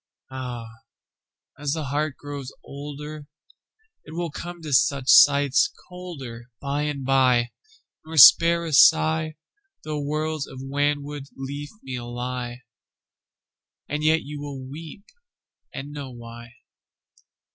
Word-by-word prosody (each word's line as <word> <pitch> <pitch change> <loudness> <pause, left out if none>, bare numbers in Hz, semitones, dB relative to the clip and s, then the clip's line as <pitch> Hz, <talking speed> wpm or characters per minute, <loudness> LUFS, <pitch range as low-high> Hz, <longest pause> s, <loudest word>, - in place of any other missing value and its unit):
Áh! 125 -3 -5 0.9
ás 145 -1 -1
the 160 - -3
heart 145 +1 -2
grows 145 -2 -7
olderIt 145 +1 -8 0.8
will 165 +1 -4
come 175 +3 -7
to 150 -2 -4
such 135 +1 +3
sights 140 - +6 0.2
colderBy 140 -4 -5
and 140 -3 -5
by, 125 -3 +3 0.5
nor 160 0 -7
spare 165 +8 +8
a - - -3
sighThough 80 - +5 0.5
worlds 155 0 -2
of 130 - -10
wanwood 145 +1 -2
leafmeal 135 - -7
lie; 125 0 -5 1.2
And 150 +1 -3
yet 160 +1 +3
you 145 +1 -7
wíll 135 -3 -7
weep 160 +6 -9 0.7
and 140 +2 -7
know 145 -2 -6
why. 120 -1 -10
140 Hz, 105 wpm, -24 LUFS, 130-150 Hz, 1.2 s, spare